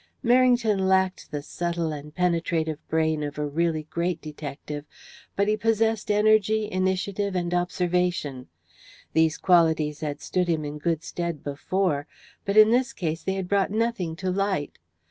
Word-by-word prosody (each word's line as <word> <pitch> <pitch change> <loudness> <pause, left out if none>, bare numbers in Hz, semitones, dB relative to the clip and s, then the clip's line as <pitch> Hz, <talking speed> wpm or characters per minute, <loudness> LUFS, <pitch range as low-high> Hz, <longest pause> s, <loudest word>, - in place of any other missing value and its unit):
Merrington 240 -5 +4
lacked 190 -1 +1
the 145 -2 -4
subtle 170 0 -2
and 150 0 -7
penetrative 165 -3 0
brain 160 -1 +1
of 145 0 -4
a 150 - -1
really 160 +1 0
great 170 +2 -2
detective, 150 -1 -7 0.5
but 200 +1 +1
he 215 - +3
possessed 225 0 +1
energy, 215 0 +3
initiative, 190 +1 -1
and 175 -1 -1
observation. 175 -6 -1 0.7
These 160 -1 +3
qualities 160 -4 +3
had 150 -2 -4
stood 180 -1 -1
him 160 -3 0
in 150 +1 -6
good 165 +1 -1
stead 170 -4 -4
before, 145 +1 -1 0.4
but 200 +1 0
in 215 +1 +8
this 255 +2 +2
case 165 -3 -3
they 190 - -1
had 190 -2 -3
brought 200 0 +2
nothing 215 -6 -1
to 185 +2 -2
light. 190 -6 -1
175 Hz, 150 wpm, -25 LUFS, 155-200 Hz, 0.7 s, in